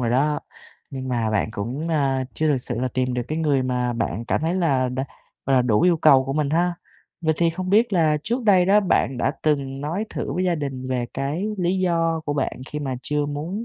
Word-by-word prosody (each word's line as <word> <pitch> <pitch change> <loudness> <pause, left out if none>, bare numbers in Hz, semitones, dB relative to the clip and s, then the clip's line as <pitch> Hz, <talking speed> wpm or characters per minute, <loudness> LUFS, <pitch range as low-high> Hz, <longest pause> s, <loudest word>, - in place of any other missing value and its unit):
rồi 120 -2 0
đó. 145 +4 +2 0.5
Nhưng 130 -1 -5
mà 115 -3 0
bạn 110 -1 +1
cũng, 125 +11 -4
a, 135 -4 +1
chưa 155 - 0
thực 145 - +3
sự 120 - -4
là 130 - 0
tìm 130 -1 0
được 125 - -1
cái 155 +1 -2
người 145 -4 +2
mà 125 -1 -1
bạn 115 -1 -2
cảm - - 0
thấy 165 +3 0
là 140 -8 +1
đã, 130 +2 -2 0.4
gọi 135 -1 +3
là, 125 - +5
đủ 110 -4 +2
yêu 175 -2 +4
cầu 135 -4 +5
của 135 - -3
mình 145 -1 0
ha. 175 +2 +1 0.5
Vậy 160 -2 +1
thì 170 -1 +2
không 185 +2 -4
biết 220 +2 +4
là 155 -4 +3
trước 240 +3 -1
đây 190 -4 +5
đó 205 +2 +5
bạn 135 -8 +1
đã 135 - +1
từng 140 -3 0
nói 165 +9 -2
thử - - -4
với 185 +1 -1
gia 180 - +2
đình 135 -4 -4
về 125 -2 -1
cái 145 +8 -2
lý 180 +1 +1
do 165 -3 +1
của 145 - -1
bạn 145 -3 -2
khi 150 - -3
mà 135 -3 -3
chưa 150 0 -1
muốn 160 +10 -4
145 Hz, 240 wpm, -23 LUFS, 130-170 Hz, 0.5 s, là